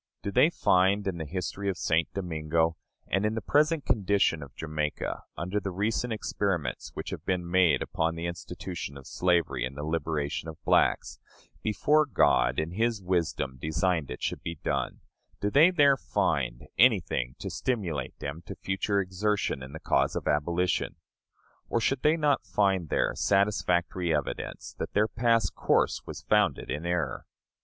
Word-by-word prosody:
Do 100 - -2
they 130 +9 +5
find 100 - +3
in 95 -3 -2
the 80 - -3
history 95 +3 -3
of 95 - -2
St. 80 +1 +1
Domingo, 80 -3 0 0.3
and 95 +2 0
in 105 +1 0
the - - 0
present 150 +2 +2
condition 100 -6 +2
of 70 -2 -10
Jamaica, 75 -1 -3 0.2
under 90 +5 -1
the 100 - -4
recent 105 +6 -1
experiments 100 -6 -2
which - - -5
have - - -6
been 90 -2 -1
made 90 -2 +3
upon 80 0 -1
the 85 +1 -4
institution 85 -3 -6
of 70 - -12
slavery 90 -8 +1
in 65 +2 -4
the 75 - -5
liberation 80 -1 -2
of 80 - -7
the - - -42
blacks, - - +2 0.4
before 150 +8 +2
God, 60 - +3
in 80 +2 -1
his 115 +3 0
wisdom, 85 -8 -1
designed 80 -1 0
it - - -7
should - - -2
be 85 - -4
done - - -2 0.4
do 105 - -1
they 155 - +7
there 145 -6 +5
find - - -1
anything 90 - +3
to - - -5
stimulate 85 - -2
them 70 +3 -5
to - - -6
future 100 +1 -1
exertion 95 -5 -1
in 65 +1 -8
the 80 - -7
cause - - +1
of - - -3
abolition? 85 +5 0 0.7
Or 115 - +1
should 125 +4 0
they 155 +2 +3
not 150 -3 +2
find 95 -6 +1
there - - +1
satisfactory 90 -4 +1
evidence 75 -2 -4
that - - -4
their 105 +1 +3
past 115 -4 +2
course - - +1
was - - -7
founded - - +1
in 75 +6 -3
error? 85 -8 -2
90 Hz, 165 wpm, -28 LUFS, 80-105 Hz, 0.7 s, they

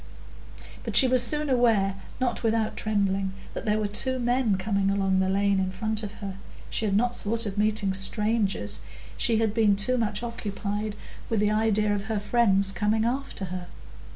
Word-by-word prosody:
But - - -4
she 260 - +8
was 255 -1 +4
soon 300 +5 +2
aware, 225 -7 +2 0.2
not 250 -2 -1
without 225 -1 0
trembling, 195 -2 0 0.2
that - - -6
there 210 0 +2
were 215 - -1
two 260 +6 -1
men 245 -4 +1
coming 195 0 0
along 195 -1 +1
the 190 0 +1
lane 200 0 +2
in 190 0 0
front 215 +3 -1
of 210 -2 -6
her; 195 -2 -7 0.3
she 225 - -1
had 200 -2 +1
not 245 +2 +1
thought 225 +2 -2
of 200 -2 -4
meeting 210 -1 +1
strangers, 195 - 0 0.3
she 230 -2 +2
had 220 -2 +1
been 215 -3 +3
too 245 +5 +1
much 210 0 -1
occupied 210 -2 -4 0.3
with 225 - +1
the 210 0 +2
idea 215 -1 +2
of 200 0 -3
her 220 -1 -2
friends 200 -2 +3
coming 210 +4 +1
after 255 -4 -3
her. 180 -1 -5
210 Hz, 180 wpm, -26 LUFS, 195-230 Hz, 0.3 s, she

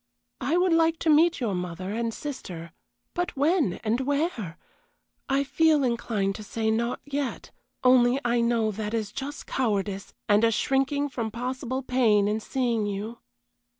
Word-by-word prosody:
I 300 +7 +1
would 360 -1 +3
like 330 0 +3
to 320 - +3
meet 325 +3 +4
your 230 -6 -1
mother 180 +1 -4
and 230 +1 -1
sister 190 - -7 0.4
but 355 -4 -2
when, 295 - +2
and 225 +2 +1
where? 280 - -1 0.7
I 275 +1 +2
feel 310 +1 +3
inclined 225 -5 0
to 215 - -8
say, 220 +1 -1
not 235 +2 0
yet, 285 -2 -3 0.3
only 255 0 +5
I 240 0 +2
know 230 -2 +2
that 210 +2 -3
is 215 -3 -2
just 280 +5 -6
cowardice, 200 -5 -2
and 210 +1 +4
a 230 - +6
shrinking 270 +5 +1
from 230 -4 -3
possible 255 +3 -3
pain 225 -6 +3
in 210 +1 0
seeing 235 -2 -1
you. 210 +4 -4
240 Hz, 155 wpm, -26 LUFS, 215-280 Hz, 0.7 s, a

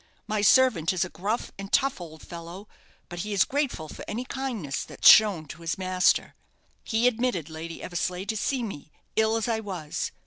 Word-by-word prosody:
My 215 -1 -1
servant 215 - +4
is 185 0 +1
a - - -8
gruff 210 +6 -3
and 195 0 -7
tough 275 -7 +2
old 160 -2 -10
fellow, 170 +4 -9 0.4
but 175 - -8
he 210 +4 -3
is 195 - +4
grateful 275 - -2
for - - -9
any 240 +4 -4
kindness 245 - -3
that's - - 0
shown 200 -7 +7
to 160 - -9
his 165 0 -2
master. 185 0 +2 0.5
He 225 +2 0
admitted 225 - -1
Lady 165 +1 -7
Eversleigh 180 +1 -3
to 220 +2 -2
see 250 +4 -1
me, 155 -9 -7 0.2
ill 220 0 +3
as 225 0 -1
I 225 -2 0
was. 180 -8 -4
195 Hz, 185 wpm, -26 LUFS, 170-225 Hz, 0.5 s, shown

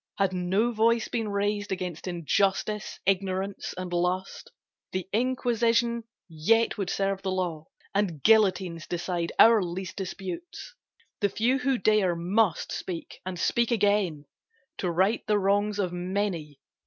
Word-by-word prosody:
Had 195 -2 +1
no 190 +6 +1
voice 230 0 +2
been 225 -3 -2
raised 205 0 -1
Against 180 -2 -4
injustice, 195 +4 0
ignorance 195 0 -1
and 185 -1 -5
lust 180 +2 -1 0.4
The 185 0 -3
Inquisition 235 -1 +1 0.2
yet 195 +8 +2
would 195 -3 -3
serve 195 0 -1
the 190 - -2
law 175 -4 -2 0.3
And 185 -8 -1
guillotines 190 -6 +3
decide 175 -1 -2
our 225 -2 +7
least 180 +1 -5
disputes. 190 - -6 0.5
The 205 - +2
few 240 +7 +1
who 260 0 +1
dare 200 -4 +3
must 180 +2 +1
speak 175 -3 -6
and 180 -2 -4
speak 235 +6 +1
again 200 - +1 0.5
To 180 - 0
right 190 +6 +2
the 210 - +3
wrongs 205 +1 +1
of 185 -4 -1
many. 175 -5 -3
195 Hz, 135 wpm, -27 LUFS, 180-215 Hz, 0.5 s, our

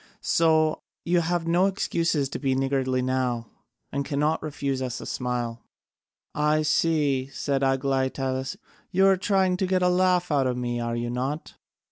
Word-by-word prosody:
So 160 -1 +3 0.2
you 175 0 +3
have 170 0 -1
no 175 +3 +3
excuse 165 -6 0
to 140 - -6
be 135 -2 0
niggardly 130 -1 0
now, 125 -2 -1 0.5
and 140 0 -1
cannot 150 +2 0
refuse 140 -3 -3
us 125 -2 -3
a - - -8
smile." 120 -2 -3 0.7
"I 150 +1 +2
see," 145 -4 +1
said 140 0 -2
Aglaïtadas, 135 +2 0 0.3
"you 190 +2 +3
are 195 0 +6
trying 190 -1 +1
to 190 - 0
get 185 0 +1
a 180 - +4
laugh 180 -1 +2
out 140 -3 +2
of 125 -1 -1
me, 120 -1 -2
are 120 0 -2
you 120 0 -2
not?" 135 +5 -3
140 Hz, 160 wpm, -25 LUFS, 130-170 Hz, 0.7 s, are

